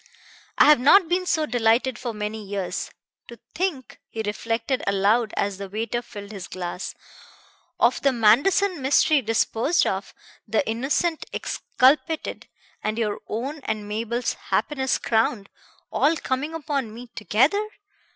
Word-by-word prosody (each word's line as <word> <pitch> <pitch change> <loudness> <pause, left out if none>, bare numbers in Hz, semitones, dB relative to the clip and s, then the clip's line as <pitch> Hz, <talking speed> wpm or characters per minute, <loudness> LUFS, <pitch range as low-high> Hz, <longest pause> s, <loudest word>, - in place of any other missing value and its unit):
I - - +7
have 300 -3 +7
not 330 +8 +6
been 360 +2 0
so 315 -3 +2
delighted 240 0 +1
for 240 - -3
many 210 0 -5
years. 190 -3 -4 0.4
To 235 - -11 0.2
think," 335 -8 -3
he 220 - -4
reflected 230 +4 -2
aloud 205 +3 +2
as 200 -1 -1
the 200 -1 -6
waiter 225 +4 -2
filled 205 -3 -10
his 195 -4 -7
glass, 180 0 -5 0.8
"of 240 +2 +3
the 275 - +3
Manderson 280 - +3
mystery 280 +2 +4
disposed 225 +6 +1
of, 195 +1 -3 0.3
the 220 +1 0
innocent 275 +8 0
exculpated, 305 +5 0 0.4
and 215 +1 -1
your 215 -3 -1
own 270 +8 -4
and 215 -1 -3
Mabel's 230 +3 -2 0.2
happiness 265 -4 0
crowned 220 -2 0 0.4
all 320 +3 +2
coming 290 +5 -2
upon 280 -7 -2
me 235 +3 -9
together! 265 - +2
235 Hz, 135 wpm, -24 LUFS, 215-285 Hz, 0.8 s, I